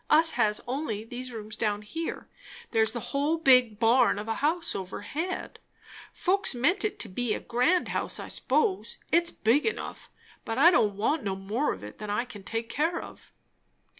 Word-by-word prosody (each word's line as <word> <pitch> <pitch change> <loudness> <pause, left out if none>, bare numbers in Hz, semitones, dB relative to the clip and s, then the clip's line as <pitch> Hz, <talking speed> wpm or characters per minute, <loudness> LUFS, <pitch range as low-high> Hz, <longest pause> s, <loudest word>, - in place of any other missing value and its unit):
Us 320 +2 +5
has 210 0 +1
only 245 -5 -2
these 250 +2 -7
rooms 215 -2 -6
down 210 -2 -1
here; 325 +10 -5 0.4
there's 220 -1 +2
the 240 - -4
whole 290 +4 +1
big 250 -8 +5
barn 230 +1 +4
of 210 +1 -5
a 225 - 0
house 325 +3 0
overhead. 205 - -5 0.5
Folks 390 -6 0
meant 345 +12 +2
it 425 -3 -1
to - - -1
be 220 +3 -1
a - - -4
grand 255 +10 +1
house, - - -3
I - - -6
s'pose; 395 -4 0
it's 340 0 +4
big 240 +3 +2
enough; 445 - -4 0.3
but 225 +1 -3
I 330 +6 +7
don't 210 - +3
want 255 +10 +1
no 195 -2 -1
more 210 +9 -1
of - - -7
it 105 - -10
than 210 - -6
I 210 +4 0
can 210 -4 -10
take 225 +3 -3
care 320 +8 0
of." - - -12
245 Hz, 185 wpm, -28 LUFS, 215-320 Hz, 0.5 s, I